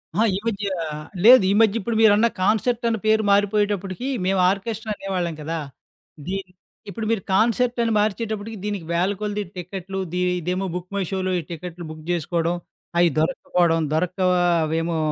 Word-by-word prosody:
ఆ! - - 0 0.2
ఈ - - 0
మధ్య 205 -2 -1 0.6
లేదు 250 -2 +9
ఈ - - +3
మధ్య 220 0 +3
ఇప్పుడు 230 +2 -3
మీరన్న 220 +1 +6
కాన్సెర్టనే 225 +3 +1
పేరు 220 0 +3
మారిపోయేటప్పటికి, 205 +1 +1 0.2
మేము 190 0 +1
ఆర్కెస్ట్రా 215 +2 -4
అనేవాళ్ళం 180 -5 -3
కదా! 165 +2 -3 0.7
దీన్ని 190 -1 -4 0.4
ఇప్పుడు 220 +2 -5
మీరు 225 - 0
కాన్సెర్టని 235 +2 +2
మార్చేటప్పటికి 220 +1 -2
దీనికి 205 -5 -3
వేలకొలది 205 +4 -1
టికెట్లు, 190 +2 -5
ది 180 - 0 0.2
ఇదేమో 180 +3 -2
బుక్ 180 +1 -6
మై 200 - 0
షోలో 185 -1 -1
ఈ - - -3
టికెట్లు 170 0 -7
బుక్ 155 0 -10
చేసుకోడం, 170 +1 0 0.4
అయ్యి 175 - +5
దొరకకపోవడం 165 0 +1
దొరక్క 180 +4 -1 0.5
అవేమో 165 +1 -1
195 Hz, 145 wpm, -23 LUFS, 180-215 Hz, 0.7 s, లేదు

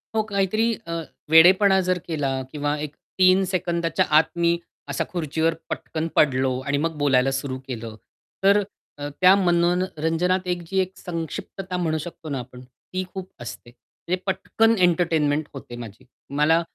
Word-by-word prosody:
हो. 220 - +3
काहीतरी 215 +4 +1
अ, 170 - -3 0.4
वेडेपणा 190 +5 +7
जर 185 - +3
केला 140 -5 -1
किंवा 145 -1 -1 0.4
3 185 +1 +6
सेकंदाच्या 170 -2 0
आत 160 - +7
मी 170 0 +2 0.3
असा 140 - -1
खुर्चीवर 160 -1 0 0.2
पटकन 160 0 -3
पडलो. 130 -3 +3
आणि 140 0 0
मग 160 +1 -1
बोलायला 135 -2 +3
सुरू 135 0 -3
केलं. 115 -3 -6 0.5
तर 200 +1 +6 0.4
अ, 145 - -8
अ, - - -3
त्या 185 +1 +8
मनो 175 -2 +3
न 185 +1 +1
रंजनात 180 +4 0
एक 175 -1 -1
जी 190 +2 0
एक 185 0 0
संक्षिप्तता 180 +2 -5
म्हणू 160 -3 0
शकतो 160 0 -8
ना 140 - -2
आपण, 125 0 -10
ती 130 +9 -7
खूप 190 -1 -6
असते. 120 0 -8
म्हणजे 175 +8 -6
पटकन 205 +4 +2
एंटरटेनमेंट 165 -4 +2
होते 130 -3 -9
माझी. 110 +4 -12 0.3
मला 160 +3 +4
165 Hz, 160 wpm, -24 LUFS, 145-185 Hz, 0.5 s, त्या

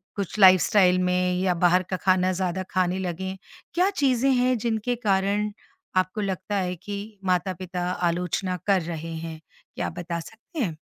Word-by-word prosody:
कुछ 200 0 -4
लाइफ़स्टाइल 185 0 +6
में, 180 0 +1
या 185 -1 +2
बाहर 180 +1 +5
का 185 - 0
खाना 185 0 +3
ज़्यादा 185 0 -2
खाने 185 0 +1
लगें? 190 +1 -4 0.4
क्या 365 +3 +3
चीज़ें 270 -7 +2
हैं 250 0 +2
जिनके 230 +2 -1
कारण 205 -1 +1 0.5
आपको 185 +3 +1
लगता 195 +1 -3
है 180 -1 -1
कि 200 +4 -6 0.3
माता-पिता 180 -1 -1 0.3
आलोचना 180 +2 -2
कर 195 -3 +4
रहे 165 0 -5
हैं, 160 -1 -6 0.4
क्या - - -2
आप 175 - -8
बता 170 -1 -3
सकते 225 - -10
हैं? 170 - -1
185 Hz, 160 wpm, -25 LUFS, 180-205 Hz, 0.5 s, लाइफ़स्टाइल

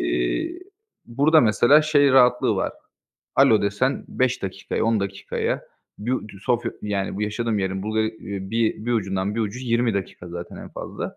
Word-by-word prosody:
İii, - - -1 0.5
burada 145 +7 +4
mesela 120 +6 +5
şey 145 -2 +4
rahatlığı 125 -2 +4
var, - - -1 0.6
alo 110 -2 +5
desen 105 +7 0
5 130 -1 0
dakikaya, 95 +2 -3
10 115 -2 +2
dakikaya 100 0 -3 0.4
bir 115 +5 -2
u - - 0 0.2
Sofya, 120 +2 0
yani, 100 -2 -2
bu 105 - -2
yaşadığım 110 +1 -1
yerin 95 0 -2
Bulga 110 +1 -1
bir, 110 +1 -1
eee, 105 +3 -2
bir 120 - +1
ucundan 95 -2 -1
bir 115 - -1
ucu 110 +3 -3
20 120 -2 +1
dakika 95 -2 -5
zaten 85 0 -7
en - - -9
fazla. - - -6
110 Hz, 165 wpm, -23 LUFS, 100-125 Hz, 0.6 s, mesela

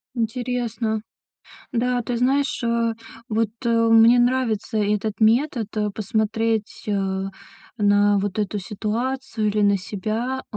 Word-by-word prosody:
Интересно. 230 -1 -2 0.7
Да, 250 +1 +1
ты 240 +1 -3
знаешь, 270 +3 +1
э, 230 -1 +1 0.3
вот, 220 -1 0
э, - - +1 0.2
мне 225 +2 +7
нравится 240 -3 +1
этот 210 0 -1
метод, 230 +1 +3
э, 210 -1 0
посмотреть, 220 +1 -1
э, 205 -1 +1 0.8
на 205 -1 +3
вот 200 0 -2
эту 210 0 -1
ситуацию 225 +4 -2
или 210 +1 0
на 200 -1 +4
себя, 220 +7 -3
э, - - -4
225 Hz, 125 wpm, -23 LUFS, 210-245 Hz, 0.8 s, мне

